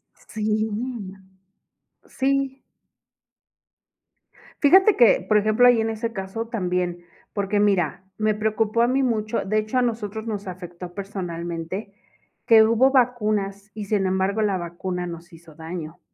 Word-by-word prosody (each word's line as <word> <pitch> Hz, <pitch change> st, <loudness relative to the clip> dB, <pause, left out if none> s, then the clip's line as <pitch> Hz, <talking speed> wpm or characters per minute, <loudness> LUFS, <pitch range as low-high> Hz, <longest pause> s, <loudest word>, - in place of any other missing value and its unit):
Sí, 215 Hz, 0 st, -2 dB, 1.4 s
sí. 270 Hz, 0 st, -1 dB, 2.0 s
Fíjate 380 Hz, +7 st, +6 dB
que, 240 Hz, -3 st, +5 dB
por 215 Hz, -, +4 dB
ejemplo, 215 Hz, +4 st, +4 dB
ahí 245 Hz, -2 st, +6 dB
en 225 Hz, 0 st, 0 dB
ese 225 Hz, +1 st, -3 dB
caso 210 Hz, +3 st, -5 dB
también, 180 Hz, -5 st, -2 dB, 0.3 s
porque 200 Hz, 0 st, 0 dB
mira, 190 Hz, -4 st, +1 dB
me 215 Hz, 0 st, +1 dB
preocupó 215 Hz, +1 st, 0 dB
a 240 Hz, -, +3 dB
mí 265 Hz, +2 st, +2 dB
mucho, 225 Hz, -3 st, -1 dB
de 215 Hz, +2 st, 0 dB
hecho, 215 Hz, +4 st, -1 dB
a -, -, +3 dB
nosotros 220 Hz, -2 st, -3 dB
nos 205 Hz, -3 st, -4 dB
afectó 175 Hz, -1 st, -8 dB
personalmente 180 Hz, 0 st, -5 dB, 0.5 s
que 225 Hz, -1 st, +8 dB
hubo 230 Hz, +4 st, +4 dB
vacunas, 215 Hz, -6 st, 0 dB
y 210 Hz, -1 st, -6 dB
sin 195 Hz, -1 st, +1 dB
embargo 190 Hz, +3 st, 0 dB
la 200 Hz, -3 st, +1 dB
vacuna 180 Hz, +1 st, -4 dB
nos 170 Hz, +1 st, -9 dB
hizo 165 Hz, -1 st, -15 dB
daño. 160 Hz, +1 st, -7 dB
210 Hz, 135 wpm, -23 LUFS, 180-225 Hz, 2.0 s, que